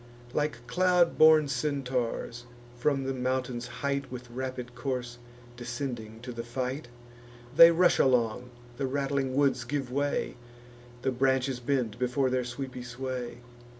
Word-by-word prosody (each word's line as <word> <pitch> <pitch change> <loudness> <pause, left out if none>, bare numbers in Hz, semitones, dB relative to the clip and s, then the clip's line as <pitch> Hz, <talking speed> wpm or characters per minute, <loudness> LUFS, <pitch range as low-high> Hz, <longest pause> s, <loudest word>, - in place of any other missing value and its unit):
Like 145 -5 -1
cloud 180 +6 +3
born 155 -1 +7
Centaurs, 125 -4 -2 0.3
from 135 +2 +1
the 135 0 -2
mountain's 125 -1 -2
height 140 +2 -3
With 125 -1 -8
rapid 130 -1 -5
course 120 -1 -4 0.4
descending 120 -2 -5
to 125 +1 -6
the 115 -1 -5
fight; 125 +3 -4 0.7
They 165 +2 +11
rush 175 +1 +4
along; 125 -1 +2 0.3
the 135 - -1
rattling 135 -1 -1
woods 140 -3 +2
give 135 0 -3
way; 140 -1 -1 0.7
The 130 - +1
branches 130 0 +1
bend 125 -4 -1
before 125 +1 +1
their 125 -1 0
sweepy 130 +1 -6
sway. 125 -1 -5
130 Hz, 130 wpm, -29 LUFS, 120-140 Hz, 0.7 s, They